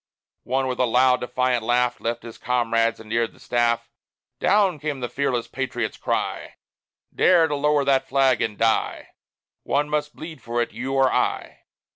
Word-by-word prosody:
One, 130 +1 0
with 130 -1 -3
a 125 - +4
loud, 125 +2 +3
defiant 125 0 0
laugh, 120 +1 +1
Left 115 +1 -3
his 115 -1 -10
comrades 115 -2 0
and 110 - -12
neared 115 +1 -1
the - - -21
staff. 120 -1 0 0.5
"Down!" 185 -3 +2
came 150 -2 -3
the 125 - -3
fearless 125 -1 -1
patriot's 125 -4 -3
cry, - - -3 0.6
"Dare 175 -3 +4
to 150 - -2
lower 145 0 +1
that 135 -1 +2
flag 135 -2 +3
and 105 -2 -2
die! 115 -1 0 0.5
One 145 +1 0
must 150 0 -2
bleed 160 0 -9
for 120 +1 -3
it 120 - -1
you 130 +3 -4
or 135 -1 +3
I." - - -2
125 Hz, 170 wpm, -23 LUFS, 120-140 Hz, 0.6 s, a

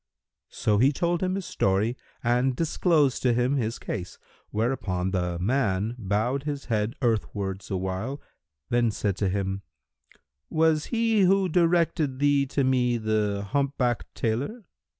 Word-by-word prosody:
So 105 -1 +1
he 135 +5 +5
told 170 +4 0
him 185 0 0
his 195 -2 -4
story 100 +5 +1 0.3
and 125 +2 +2
disclosed 160 -2 +2
to 125 -2 +3
him 125 +4 +1
his 115 -3 -1
case, 90 -4 -5 0.3
whereupon 105 -5 -1
the 90 -2 -1
man 105 +1 0
bowed 110 +6 0
his 145 -1 -4
head 110 +1 -1
earthwards 100 -4 -1
awhile, 95 +8 -3 0.5
then 120 -1 +3
said 100 -2 -1
to 100 - 0
him, 95 0 -2 0.9
"Was 160 -1 +2
he 225 -2 +2
who 190 +1 +4
directed 165 -5 +2
thee 140 0 +3
to 140 +1 0
me 125 -2 +2
the 105 -2 -1
humpbacked 135 -4 0
tailor?" 135 - -2
120 Hz, 135 wpm, -26 LUFS, 105-145 Hz, 0.9 s, he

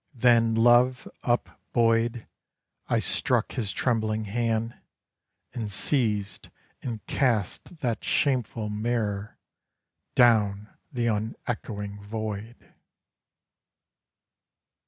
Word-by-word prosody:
Then 115 -2 +4
love 120 +2 +4
upbuoyed 115 -1 +1 0.6
I 115 - +2
struck 105 +4 0
his 110 -6 -2
trembling 110 -3 0
hand, 115 +2 -1 0.8
and 110 -4 -4
seized 105 -4 -1 0.3
and 115 -4 -5
cast 125 - -1
That 115 -5 -1
shameful 120 -6 0
mirror 105 -1 -2 0.8
down 105 -4 +4 0.2
the 120 -2 -1
unechoing 105 -2 -3
void. 110 +2 -6
115 Hz, 75 wpm, -27 LUFS, 105-120 Hz, 0.8 s, Then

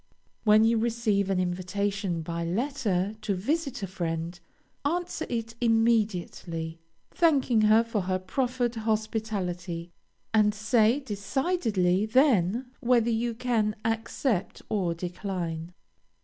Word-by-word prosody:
When 215 0 +6
you 225 0 +3
receive 220 -4 +1
an 190 -1 +1
invitation 185 0 -1
by 170 +1 -3
letter 205 -1 -1
to 210 -2 -1
visit 275 - -2
a - - -1
friend, 170 -1 -3 0.4
answer 340 +2 -2
it 230 -1 -3
immediately, 205 -8 0 0.3
thanking 275 -9 +3
her 215 +2 +5
for 230 -3 -2
her 185 0 0
proffered 245 +4 -1
hospitality, 210 -6 -2 0.4
and 210 -1 +4
say 220 +4 +3
decidedly 210 - 0
then 245 - +3
whether 235 -1 +3
you 230 +1 -1
can 225 -3 0
accept 225 -2 -1
or 180 -5 0
decline. 175 -2 -4
215 Hz, 110 wpm, -28 LUFS, 185-235 Hz, 0.4 s, When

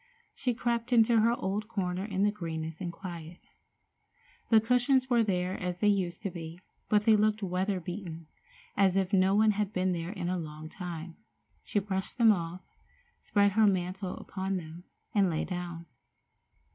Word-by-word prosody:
She 250 -3 -1
crept 235 +1 -1
into 230 -1 +5
her 230 +2 +4
old 200 +3 -2
corner 185 -4 -2
in 200 -2 -1
the 205 - +4
greenness 160 -4 -5
and 175 -2 -3
quiet. 170 -1 -8 1.1
The 225 - +7
cushions 250 +3 +2
were 235 -1 +5
there 185 -2 0
as 180 -1 -3
they 210 - +4
used 185 -2 0
to 195 - -2
be, 165 0 -8 0.3
but 210 -1 +4
they 220 0 +6
looked 215 0 +2
weather 190 +1 0
beaten, 175 -2 -6 0.5
as 190 -2 +3
if 195 0 0
no 190 0 +4
one 215 +1 +5
had 210 -1 -1
been 185 0 +1
there 170 -1 -3
in 185 -3 -4
a 180 0 -1
long 155 -1 -7
time. 170 -2 -7 0.5
She - - -3
brushed 190 -1 -2
them 230 -2 +7
off, 175 -2 -2 0.6
spread 205 -1 +2
her 215 +2 +4
mantle 185 0 -1
upon 190 0 -3
them, 170 +1 -9 0.3
and 200 -3 +4
lay 160 -2 -1
down. 175 -2 -5
190 Hz, 170 wpm, -30 LUFS, 175-210 Hz, 1.1 s, The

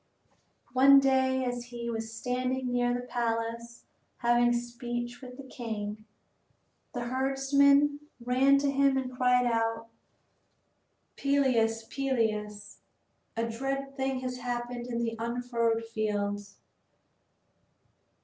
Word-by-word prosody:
One 275 +2 +8
day 260 -1 +2
as 245 -1 -3
he 240 -1 -5
was 225 -1 -4
standing 250 +2 -2
near 245 0 +1
the 245 0 -2
palace 235 -1 -3 0.3
having 240 0 +3
speech 240 0 -4
with 250 -1 -10
the 275 - -8
king, 215 -4 -5 0.9
a 245 - -2
herdsman 275 +3 +3 0.2
ran 255 +3 +4
to 280 0 +1
him 275 -1 +3
and 255 -1 -3
cried 250 0 +3
out: 230 -1 0 1.3
"Peleus, 250 -5 +2
Peleus, 220 -5 -2 0.6
a 230 0 0
dread 270 +4 -3
thing 265 -1 -1
has 250 -1 -4
happened 240 0 -4
in 235 -1 -2
the 230 -1 -2
unfurrowed 235 -1 -1
fields." 205 -2 -3
245 Hz, 110 wpm, -29 LUFS, 230-260 Hz, 1.3 s, One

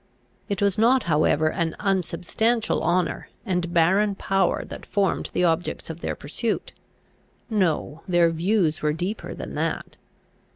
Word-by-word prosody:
It 200 0 -1
was 200 0 +2
not 250 +4 +4
however 155 -1 +2
an 165 -1 -1
unsubstantial 200 +4 0
honour 175 +3 0 0.2
and 180 -4 -1
barren 190 +5 +3
power 195 0 +1
that - - -9
formed 200 -1 0
the - - 0
objects 165 -1 0
of 160 - -9
their - - -2
pursuit: 210 +10 -3 0.8
no, 165 -6 0
their 175 -2 +4
views 165 -1 +1
were 150 0 +1
deeper 180 +7 -4
than - - -7
that. - - -3
180 Hz, 135 wpm, -24 LUFS, 165-200 Hz, 0.8 s, not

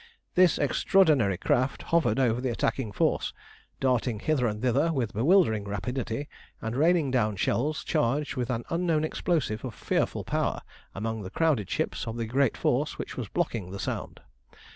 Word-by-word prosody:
This 180 -3 +5
extraordinary 145 - +3
craft 130 +8 0
hovered 170 -4 +3
over 125 -2 +2
the 130 - -1
attacking 115 -1 -1
force, - - 0 0.5
darting 125 -4 +1
hither 135 -1 +1
and 105 -1 -3
thither 135 +7 +2
with 125 -8 -1
bewildering 115 - +3
rapidity, 115 +6 -3 0.3
and 110 +1 -4
raining 160 -1 +3
down 110 -5 +1
shells 140 +10 0
charged 140 +6 0
with 125 -2 -2
an 120 -2 -1
unknown 165 -2 +1
explosive 155 -8 -1
of 125 -5 -5
fearful - - -1
power - - -1 0.3
among 110 +2 -3
the 95 - -6
crowded 140 - +1
ships - - -2
of 115 +1 -4
the 115 - -2
great 130 +2 +1
force - - 0
which - - -6
was - - -4
blocking 100 -6 -2
the 100 +1 -7
Sound. - - -4
125 Hz, 165 wpm, -27 LUFS, 110-150 Hz, 0.5 s, This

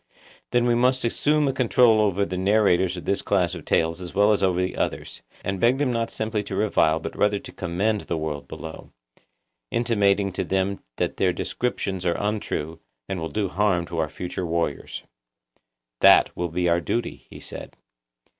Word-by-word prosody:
Then 120 0 +2
we 120 - +3
must 125 +1 +2
assume 150 +5 +2
a 135 - +1
control 120 -3 +4
over 100 -1 +1
the 90 - -5
narrators 95 -2 +2
of 90 - -8
this 100 0 0
class 90 -3 +1
of - - -8
tales 80 +2 +1
as 90 -2 -8
well 105 +2 +5
as 100 - 0
over 95 -2 +2
the 90 0 -1
others, - - -3 0.2
and 95 -1 -2
beg 120 +5 +3
them 135 -3 0
not 115 -1 -1
simply 110 -1 -2
to - - -5
revile 80 -7 +2
but 80 - -6
rather 105 0 +2
to - - -9
commend 100 +5 -1
the 85 - -3
world 75 -2 -4
below, 80 0 -9 0.8
intimating 100 - +2
to 95 - -2
them 95 +1 -1
that - - -2
their - - +2
descriptions 95 -6 -3
are 85 -1 +1
untrue, 100 -6 -3 0.3
and 95 - -3
will 80 0 -4
do 105 -2 -1
harm 95 -2 +1
to 85 -1 -5
our 80 -2 0
future 90 +3 -5
warriors. 85 -3 -2 1.0
That - - +6
will 90 0 -2
be 90 +2 -1
our 85 0 +2
duty, 120 +6 -3
he - - -11
said. - - -9
100 Hz, 185 wpm, -24 LUFS, 85-110 Hz, 1.0 s, That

